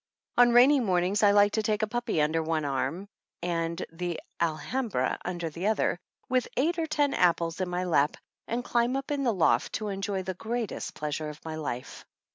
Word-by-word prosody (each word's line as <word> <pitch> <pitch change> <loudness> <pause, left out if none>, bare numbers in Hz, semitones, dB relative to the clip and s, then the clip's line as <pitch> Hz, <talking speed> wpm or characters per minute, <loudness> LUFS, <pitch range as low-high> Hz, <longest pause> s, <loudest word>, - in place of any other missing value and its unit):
On 245 0 +6
rainy 260 +4 +7
mornings 190 -3 +1
I 205 - +6
like 205 0 +5
to 220 - 0
take 215 0 0
a - - +1
pupjjy 240 -9 0
under 160 +2 +1
one 160 -1 -1
arm 140 +7 -2 0.4
and 170 -1 -1 0.2
Tike 175 -2 -2 0.2
Alhambra 170 - -1
under 175 -2 -3
the 175 +6 -3
other, 215 -4 +1 0.3
with 255 -1 +1
eight 330 +6 +1
or 325 - 0
ten 290 -2 +1
apples 170 -1 +2
in 185 - -1
my 180 +1 -1
lap, 155 -5 +2 0.3
and 240 +2 -2
climb 240 +1 +1
up 275 +1 -3
in 285 -1 0
the 250 -3 +2
loft 185 -6 +2
to 215 -1 -2
enjoy 195 -1 -2
the 185 +1 -3
greatest 225 +3 -4
pleasure 150 0 -3
of 150 +1 -11
my 160 - -4
life. 135 -5 -5
190 Hz, 195 wpm, -28 LUFS, 165-240 Hz, 0.4 s, rainy